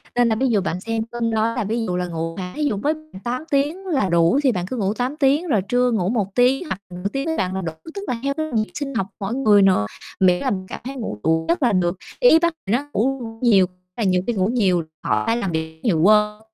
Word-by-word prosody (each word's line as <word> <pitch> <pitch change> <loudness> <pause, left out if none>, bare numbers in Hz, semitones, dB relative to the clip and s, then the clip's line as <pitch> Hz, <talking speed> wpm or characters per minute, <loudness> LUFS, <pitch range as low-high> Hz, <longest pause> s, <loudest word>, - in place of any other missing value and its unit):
nên 245 -1 +4
là 220 - +2
ví 260 +4 +1
dụ 210 -4 +2
bạn 180 -1 -3
xem 225 +1 -2
cân 235 -1 -1
đo 225 +1 +1
là 245 - -1
ví 225 +3 -1
dụ 180 -4 -2
là 180 0 -1
ngủ, 165 0 -4
à, 180 -1 -6
thí 305 - -2
dụ 255 -9 0
mới 290 +10 +1 0.3
8 245 +4 -2
tiếng 295 +7 0
là 275 - 0
đủ 170 +9 +3
thì 265 - +4
bạn 180 -5 -2
cứ 255 - -4
ngủ 200 -2 0
8 250 +5 -2
tiếng 295 +4 +2
rồi 215 -9 +2
trưa 245 +5 +1
ngủ 190 -5 0
1 205 -4 -1
tiếng 255 +6 +3
hoặc 195 - -4
nửa 180 +2 -3
tiếng 275 +1 -2
với 320 - -1
bạn 185 0 -1
là 190 - -2
đủ, 165 -2 -4 0.2
tức 400 - -5
là 240 - -2
theo 280 0 0
cái 315 - -1
nhịp 215 -1 0
sinh 280 -2 -4
học 195 -4 0
mỗi 200 +2 -3
người 215 -7 +5
nữa, 190 - +4 0.3
miễn 180 -1 +4
là 260 - +1
mình 185 -2 -3
cảm - - -7
thấy 265 +3 -6
ngủ 220 - -5
đủ 160 0 +2
giấc 170 - +1
là 240 - +4
được. 180 -1 +1 0.2
Ý - - +6
bác 340 0 +1
thì 200 - +1
nó 265 +5 +1
ngủ 270 +5 +1 0.2
nhiều, 200 -6 +5 0.3
là 230 - -1
nhiều 185 -2 +2
khi 240 - +1
ngủ 190 -3 +1
nhiều, 195 -7 +2 0.2
họ 105 0 +1
phải 230 - +1
làm 195 -7 -2
việc 160 0 -4
nhiều, 180 -9 +2
quên 210 +2 +4
220 Hz, 275 wpm, -21 LUFS, 185-255 Hz, 0.3 s, Ý